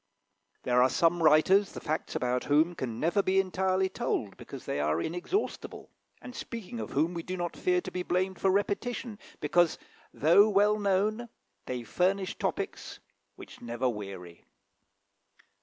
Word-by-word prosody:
There 125 0 +3
are 130 - +5
some 170 +2 +2
writers 165 +6 +4
the - - -6
facts 155 +1 -3
about 125 0 -1
whom 155 +4 +3
can 120 -8 -5
never 170 +5 +2
be 190 0 +2
entirely 190 0 +1
told, 150 - -3
because - - -10
they - - -2
are 75 +2 +1
inexhaustible, 175 - -3 0.3
and 250 - -9
speaking 230 -1 -7
of - - -5
whom 160 +5 +1
we 170 - -4
do 185 +2 -5
not 175 -1 -3
fear 365 -1 +1
to - - -7
be 180 - -3
blamed 185 +1 -1
for 195 - +3
repetition, 205 +3 -1 0.2
because, 165 +3 +2 0.3
though 175 +8 +5
well 210 +1 +3
known, 210 +4 0 0.4
they 125 -1 -3
furnish 185 - 0
topics - - -4 0.4
which - - -13
never 120 +2 -2
weary. 95 -6 -7
180 Hz, 155 wpm, -29 LUFS, 140-200 Hz, 0.4 s, are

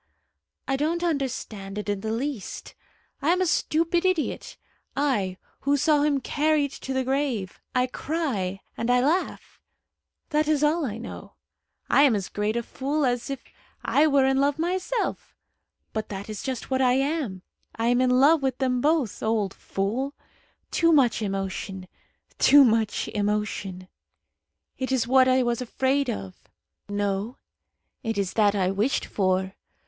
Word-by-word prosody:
"I 270 - +1
don't 330 +4 0
understand 250 - -3
it 210 - -4
in 205 -1 -1
the 220 +1 -3
least. 245 -1 -4 0.5
I 290 - +1
am 360 +2 +3
a 370 - +2
stupid 335 +1 +1
idiot 370 -5 -1 0.4
I, 210 -11 0 0.2
who 285 +1 +1
saw 295 +1 +3
him 290 -2 +2
carried 295 +1 +1
to 270 - -7
the 260 0 0
grave! 260 -8 -1 0.2
I 250 0 +3
cry 250 - -3
and 230 - -3
I 250 0 +5
laugh. 310 +9 -1 0.7
That 300 0 +2
is 305 -1 +2
all 305 0 +2
I 215 -1 -5
know. 235 - -9 0.5
I - - +4
am 275 -6 +5
as 195 -2 -3
great 210 +1 -1
a 235 - -1
fool 280 +5 -1
as 245 +1 -1
if 275 -2 -5 0.4
I 300 +2 +4
were 280 -3 +4
in 265 0 +2
love 280 +1 +2
myself. 370 +8 -2 0.6
But 220 -1 -3
that 200 +1 -6
is 210 - -5
just 265 0 -5
what 260 0 +2
I 250 -1 +4
am. 270 - -1 0.3
I 230 +1 0
am 245 +1 +3
in 255 - +3
love 280 +5 +5
with 265 -2 -1
them 255 -2 0
both. 295 -7 +1
Old 215 -3 0
fool! 240 +9 -3 0.6
Too 335 -1 +3
much 260 -7 +4
emotion 195 -1 -4 0.5
too 285 +1 +8
much 220 -3 +1
emotion. 205 -3 -2 0.9
It 260 0 -2
is 255 -4 +2
what 260 +1 +5
I 255 0 +4
was 240 0 -1
afraid 265 +2 0
of. 95 -1 -6 0.4
No; 205 +3 -2 0.6
it 225 -4 -3
is 195 -2 -1
that 210 -2 +3
I 185 -2 +1
wished 210 +8 0
for. 190 -1 0
255 Hz, 160 wpm, -25 LUFS, 210-285 Hz, 0.9 s, too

